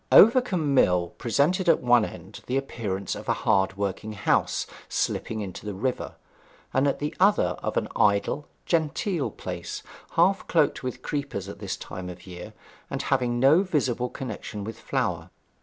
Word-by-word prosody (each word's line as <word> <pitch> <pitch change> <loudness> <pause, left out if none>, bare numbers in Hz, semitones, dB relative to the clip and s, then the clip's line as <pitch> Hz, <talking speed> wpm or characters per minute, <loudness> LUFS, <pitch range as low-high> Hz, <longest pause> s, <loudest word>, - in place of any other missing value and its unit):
Overcombe 200 - +6
Mill 90 -9 +4
presented 155 - +2
at 165 - +5
one 120 -2 +4
end - - -8
the 130 - +1
appearance 100 -8 -3
of - - -7
a - - +5
hard 95 0 +3
worked 100 -2 -2
house 105 -2 0 0.2
slipping 110 -1 -1
into 95 -3 -6
the 105 -2 -4
river, 125 +6 -2 0.6
and 135 +2 +3
at 140 - +1
the 150 +1 -3
other 200 +3 +4
of - - -2
an - - +1
idle, 105 +8 +2 0.2
genteel 165 0 0
place, - - -6 0.3
half 185 +4 +3
cloaked 155 -4 +2
with 125 -1 -5
creepers 140 -10 -3
at 100 - -8
this 100 -2 -4
time 90 -1 -7
of 90 - -9
the 95 - -11
year, 90 0 -8 0.4
and - - -3
having 120 -2 +1
no 140 +8 +6
visible 130 -9 0
connexion 110 -5 -6
with 110 +2 -7
flour. - - -2
125 Hz, 165 wpm, -26 LUFS, 100-150 Hz, 0.6 s, Overcombe